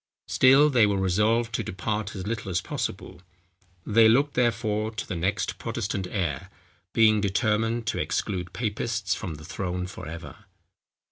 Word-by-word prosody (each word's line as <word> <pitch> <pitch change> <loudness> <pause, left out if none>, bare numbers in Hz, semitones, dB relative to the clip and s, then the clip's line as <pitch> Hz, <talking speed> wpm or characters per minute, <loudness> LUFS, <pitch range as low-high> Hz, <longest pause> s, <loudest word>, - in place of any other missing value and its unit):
Still 140 +3 +5
they 115 -5 +5
were 100 -1 0
resolved 105 +5 +1
to 115 - 0
depart 105 +3 -3
as 95 -2 -5
little 110 -2 -3
as 90 -2 +1
possible. - - -5 0.6
They 110 +1 +5
looked 140 +5 +3
therefore 110 -3 0
to 110 -2 -5
the 95 - -4
next 90 +4 -1
Protestant 110 -4 -3
heir, 85 -9 -2 0.4
being 110 -2 +4
determined 110 +3 0
to 110 - -1
exclude 90 -4 -2
papists 110 -3 -2
from 90 -5 -5
the 80 +1 -11
throne 90 0 -3
for 90 - -8
ever. 85 +2 -9
105 Hz, 150 wpm, -26 LUFS, 95-115 Hz, 0.6 s, Still